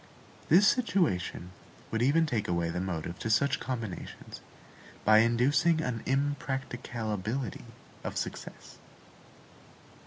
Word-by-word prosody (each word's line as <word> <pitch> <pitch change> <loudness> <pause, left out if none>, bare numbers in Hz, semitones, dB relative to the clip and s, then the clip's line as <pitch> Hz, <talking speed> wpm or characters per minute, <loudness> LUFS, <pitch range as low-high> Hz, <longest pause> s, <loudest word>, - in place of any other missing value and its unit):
This 190 +7 +7
situation 155 - +1 0.4
would 115 - 0
even 150 +6 +4
take 115 -8 -1
away 85 -1 0
the 90 - -3
motive 85 -2 -4
to 110 - -3
such 135 +5 +2
combinations, 115 -8 -6 0.6
by 110 0 +7
inducing 140 +8 +3
an 125 -7 -2
impracticability 130 -5 -2 0.4
of - - -4
success. - - -6
120 Hz, 100 wpm, -30 LUFS, 105-140 Hz, 0.6 s, This